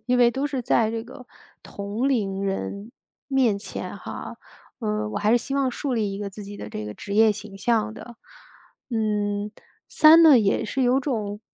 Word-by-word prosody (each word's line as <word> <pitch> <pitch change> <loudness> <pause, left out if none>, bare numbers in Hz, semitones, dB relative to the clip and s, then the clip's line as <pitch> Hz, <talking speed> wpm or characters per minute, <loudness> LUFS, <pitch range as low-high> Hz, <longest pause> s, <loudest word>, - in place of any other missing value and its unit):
因 250 0 +2
为 240 -1 +6
都 270 +4 -2
是 270 -4 -3
在 225 -1 +2
这 225 0 -3
个 255 +1 -12 0.4
同 205 +6 -3
龄 200 -7 -1
人 200 +3 -4 0.3
面 255 -7 +2
前 200 - -6
哈。 - - -8 0.4
嗯， 215 -1 -2
我 - - -2
还 210 +1 +1
是 240 - +5
希 270 - -5
望 275 -1 +1
树 270 +2 -3
立 210 -4 -1
一 - - -6
个 205 -1 -5
自 205 +1 -9
己 205 +1 -9
的 105 - -7
这 105 0 -6
个 105 - -7
职 200 - -6
业 220 0 +5
形 210 -1 -9
象 225 0 +1
的。 240 +2 -11 0.8
嗯， 210 -2 -1 0.4
三 320 +2 +7
呢， 305 -6 +8
也 200 -3 +1
是 265 +5 -2
有 255 +2 +3
种， 215 -7 -3
220 Hz, 210 characters per minute, -24 LUFS, 205-250 Hz, 0.8 s, 呢